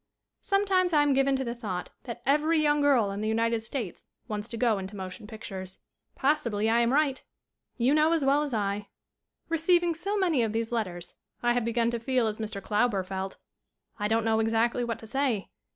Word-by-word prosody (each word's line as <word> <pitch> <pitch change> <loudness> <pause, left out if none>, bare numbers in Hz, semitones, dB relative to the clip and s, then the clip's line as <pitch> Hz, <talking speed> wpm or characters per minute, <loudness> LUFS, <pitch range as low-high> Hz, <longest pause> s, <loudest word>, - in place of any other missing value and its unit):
Sometimes 385 -3 +2
I 295 -1 +5
am 290 -1 +3
given 270 0 +3
to 265 - -1
the 235 -2 -3
thought 205 -7 -5
that 240 -1 -7
every 300 +4 +3
young 295 -1 +3
girl 255 -8 +3
in 200 +1 -4
the 215 - -1
United 230 +1 +1
States 225 -4 -5 0.2
wants 210 -2 -4
to 230 - -5
go 225 -4 +2
into 190 +2 -7
motion 190 +3 -7
pictures. 190 -4 -8 0.4
SCREEN - - -29
ACTING - - -20
21 285 +3 +6 0.3
Possibly - - +3
I 230 - +4
am 235 0 +3
right. 280 -2 +1 0.5
You 250 +3 +3
know 310 +1 +4
as 325 -4 +2
well 280 +2 +4
as 295 -2 -2
I. 205 -2 -1 0.6
Receiving 340 +1 +2
so 395 +6 -2
many 345 -9 +2
of 220 -2 0
these 225 +1 -1
letters 180 -7 -3 0.3
I 240 0 +3
have 245 -2 0
be 235 - 0
gun 235 0 +2
to 235 - -2
feel 250 0 +1
as 215 0 -2
Mr. 215 -2 -4
Klauber 210 -3 +1
felt. 190 0 -4 0.6
I 205 - 0
don't 225 +1 +1
know 220 0 +2
exactly 225 +2 +1
what 235 -2 -2
to - - -11
say. 240 -3 -1
235 Hz, 215 wpm, -28 LUFS, 215-285 Hz, 0.6 s, 21